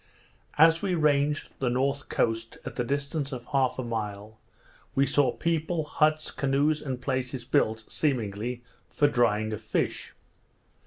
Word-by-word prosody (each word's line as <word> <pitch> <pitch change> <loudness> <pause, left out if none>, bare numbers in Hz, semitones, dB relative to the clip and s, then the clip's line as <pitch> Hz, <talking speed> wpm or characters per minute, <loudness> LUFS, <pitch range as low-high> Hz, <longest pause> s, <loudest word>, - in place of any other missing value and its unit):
As 165 +2 +6
we 190 -3 0
ranged 150 -1 +2
the 130 - +1
north 135 +3 0
coast, 115 0 -1
at - - -6
the 125 - 0
distance 140 +2 -2
of 125 -2 -6
half 135 -3 +2
a 130 - -2
mile, 110 -2 -5 0.6
we 135 - +4
saw 135 -1 +3
people, 165 +1 -1
huts, 155 +1 +1
canoes, 145 +2 +1
and 130 -3 -4
places 130 -1 -3
built, 110 -5 +1
seemingly 120 -3 -2 0.3
for 145 - +3
drying 110 -5 +1
of 105 - -5
fish. 110 - -2
135 Hz, 145 wpm, -27 LUFS, 120-150 Hz, 0.6 s, As